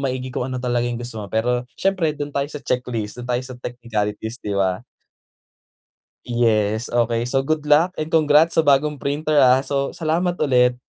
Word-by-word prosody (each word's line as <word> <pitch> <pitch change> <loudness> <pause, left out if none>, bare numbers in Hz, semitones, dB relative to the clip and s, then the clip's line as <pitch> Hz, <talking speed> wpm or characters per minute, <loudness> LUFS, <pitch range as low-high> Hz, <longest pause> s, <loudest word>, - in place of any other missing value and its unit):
maigi 130 0 -4
kung 125 - -2
ano 130 - -4
talaga 120 -1 0
yung 120 -1 -4
gusto 120 -2 -6
mo. 105 - -6
Pero 120 +3 0
siyempre 185 -5 +1
do'n 145 0 -5
tayo 140 0 -1
sa 150 -1 -7
checklist, 125 -4 -3
do'n 125 - -8
tayo 125 - -3
sa 130 -1 -8
technicalities, 110 -2 -4
di 105 - -4
ba? 95 -1 +1 1.5
Yes, 110 -2 +1
okey. 120 -1 +1
So 135 0 +2
good 155 0 0
luck 155 +5 +3
and 155 +1 -4
congrats 160 0 +4
sa 160 - +6
bagong 145 +1 +3
printer, 150 +2 0
ah. 130 -1 +5
So, 140 0 -2
salamat 170 +2 0
ulit. 125 -3 +3
125 Hz, 180 wpm, -21 LUFS, 120-150 Hz, 1.5 s, sa